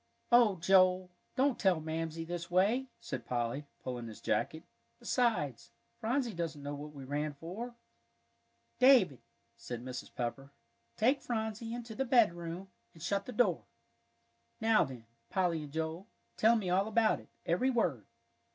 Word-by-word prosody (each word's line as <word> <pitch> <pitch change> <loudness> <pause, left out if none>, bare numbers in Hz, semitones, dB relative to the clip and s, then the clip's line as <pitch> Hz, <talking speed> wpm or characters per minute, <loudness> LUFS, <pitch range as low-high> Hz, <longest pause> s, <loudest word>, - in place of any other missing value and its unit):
"Oh, 235 -4 +6
Joel, 185 +1 +4 0.2
don't 270 0 +2
tell 185 -4 +3
Mamsie 160 +1 -3
this 170 0 -5
way," 205 +9 +3
said 130 -4 -5
Polly, 120 +4 -2 0.2
pulling 120 -2 -4
his 110 - -9
jacket. 160 +1 -1 0.3
"Besides, 215 - 0 0.3
Phronsie 240 +1 0
doesn't 165 -4 -4
know 145 0 -4
what 150 +1 -8
we 140 - -8
ran 145 +2 -2
for." 205 +11 -6 1.0
"David," 235 - +6 0.4
said 120 +1 -6
Mrs. 130 -1 -6
Pepper, 135 +2 -3 0.5
"take 260 +6 +3
Phronsie 220 -1 -3
into 235 -2 -7
the 265 - -1
bedroom 190 -7 +2 0.3
and 165 - -11
shut 200 +3 -1
the - - -4
door. 245 +1 +2 0.9
Now 225 -1 +4
then, 125 -4 -8 0.2
Polly 175 -4 +1
and 150 -2 -8
Joel, 160 +5 -3 0.3
tell 225 +2 +5
me 210 -5 -1
all 195 +3 +3
about 220 0 +3
it, - - -17 0.2
every 180 +11 +2
word." 170 - 0
175 Hz, 145 wpm, -33 LUFS, 145-225 Hz, 1.0 s, Oh